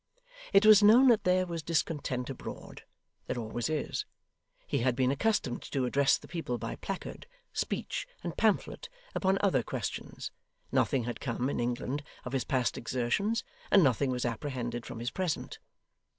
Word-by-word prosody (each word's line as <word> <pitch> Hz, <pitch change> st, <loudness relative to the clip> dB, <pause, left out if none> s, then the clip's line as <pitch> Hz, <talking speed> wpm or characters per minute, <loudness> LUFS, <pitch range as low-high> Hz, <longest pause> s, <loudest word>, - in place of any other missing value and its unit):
It 195 Hz, +2 st, +6 dB
was 215 Hz, -1 st, +9 dB
known 235 Hz, +6 st, +8 dB
that 225 Hz, -2 st, +4 dB
there 185 Hz, 0 st, +3 dB
was 170 Hz, -2 st, -4 dB
discontent 145 Hz, -5 st, -1 dB
abroad 130 Hz, -, -8 dB, 0.4 s
there -, -, -2 dB
always 115 Hz, +1 st, -3 dB
is; 155 Hz, -2 st, -2 dB, 0.6 s
he -, -, 0 dB
had 125 Hz, 0 st, +2 dB
been 130 Hz, 0 st, +2 dB
accustomed 140 Hz, -, 0 dB
to 135 Hz, -2 st, +1 dB
address 140 Hz, +2 st, +3 dB
the -, -, -14 dB
people 160 Hz, -7 st, -3 dB
by 115 Hz, 0 st, -5 dB
placard, 195 Hz, -, -6 dB, 0.3 s
speech, -, -, -2 dB, 0.2 s
and -, -, -4 dB
pamphlet, -, -, +1 dB, 0.2 s
upon 190 Hz, 0 st, +2 dB
other 185 Hz, -11 st, +3 dB
questions; -, -, -5 dB, 0.4 s
nothing 130 Hz, -3 st, +2 dB
had 120 Hz, +1 st, -4 dB
come, 125 Hz, +1 st, -1 dB
in -, -, -2 dB
England, 125 Hz, +4 st, -1 dB, 0.2 s
of 125 Hz, -, -5 dB
his 135 Hz, -, 0 dB
past 130 Hz, -4 st, 0 dB
exertions, 130 Hz, -, 0 dB, 0.3 s
and 195 Hz, -, +6 dB
nothing 135 Hz, 0 st, +3 dB
was 125 Hz, -1 st, -1 dB
apprehended 120 Hz, -1 st, -3 dB
from 125 Hz, -, -7 dB
his 120 Hz, +2 st, -3 dB
present. 180 Hz, -5 st, -3 dB
135 Hz, 160 wpm, -30 LUFS, 120-180 Hz, 0.6 s, was